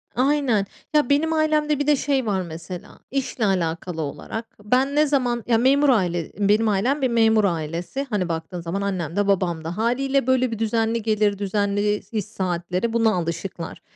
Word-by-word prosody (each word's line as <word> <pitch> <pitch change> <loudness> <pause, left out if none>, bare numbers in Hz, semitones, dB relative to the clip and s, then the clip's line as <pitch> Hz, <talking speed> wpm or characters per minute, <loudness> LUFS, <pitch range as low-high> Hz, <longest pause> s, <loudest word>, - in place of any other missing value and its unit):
aynen. 255 -6 +2 0.3
Ya, 295 -4 +3
benim 320 +3 +2
ailemde 305 -2 +1
bir 290 - -1
de 295 - +5
şey 270 -2 0
var 195 -3 0
mesela, 170 +1 -8
işle 260 -4 -1
alakalı 170 -2 -1
olarak, 220 +9 -5 0.2
ben 260 +6 +1
ne 300 +1 +4
zaman 245 -5 0
Ya, 230 -2 +4
memur 275 +4 +4
aile 175 -8 +1
Benim 210 +2 +3
ailem 250 +9 +1
bir 260 - +3
memur 225 -2 +4
ailesi. 170 - -2
Hani, 190 -5 -1
baktığın 165 +2 -4
zaman 175 +4 -3
annem 185 -4 -2
de 205 0 +1
babam 175 -5 +1
da. 170 +4 -5
Hâliyle, 265 +3 +1
böyle, 255 -2 +2
bir 225 - -4
düzenli 225 0 0
gelir, 210 -2 +1
düzenli 205 +1 0
iş 215 -3 -2
saatleri, 185 +1 -2
buna 225 -1 +3
alışıklar. 170 0 -4
215 Hz, 170 wpm, -23 LUFS, 180-255 Hz, 0.3 s, de